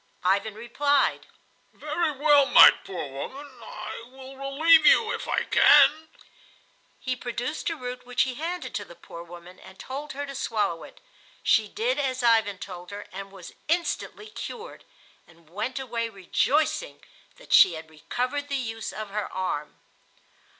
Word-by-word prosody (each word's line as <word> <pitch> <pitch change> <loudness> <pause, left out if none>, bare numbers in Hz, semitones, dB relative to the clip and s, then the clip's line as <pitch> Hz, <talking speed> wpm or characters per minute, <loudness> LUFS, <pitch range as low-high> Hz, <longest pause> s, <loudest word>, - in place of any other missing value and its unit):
Ivan 200 +3 +1
replied: 275 +5 0 0.5
"Very 310 +2 -2
well, 290 0 +4
my - - +9
poor 180 -6 -7
woman; 265 - -8
I 225 - -8
will 265 +1 -12
relieve 290 +5 +4
you 445 - +5
if - - -5
I - - 0
can." 315 +1 +5 0.9
He 255 0 -3
produced 245 +6 -4
a 330 - -3
root 250 -3 -7
which 250 0 +1
he 260 - -3
handed 340 +6 -5
to 205 - -3
the 175 - -14
poor 170 - -11
woman 175 +1 -13
and 190 - -15
told 285 +3 -7
her 285 +1 -4
to 275 - -8
swallow 210 -9 -2
it. - - -14 0.4
She 220 -1 +3
did 245 +7 -1
as 260 -2 -2
Ivan 225 -4 +3
told 180 -2 -9
her 205 0 -8
and 195 +1 -8
was 185 -3 -12
instantly 350 +5 -2
cured, 470 +2 -8 0.4
and 170 -1 -22
went 220 +8 -4
away 235 -3 -3
rejoicing 285 - -1 0.3
that - - -6
she 180 - +8
had 160 0 -9
recovered 255 - -3
the 280 - -1
use 225 -4 -4
of 215 -2 -7
her 210 -1 -3
arm. 180 -6 -3
245 Hz, 155 wpm, -26 LUFS, 195-285 Hz, 0.9 s, my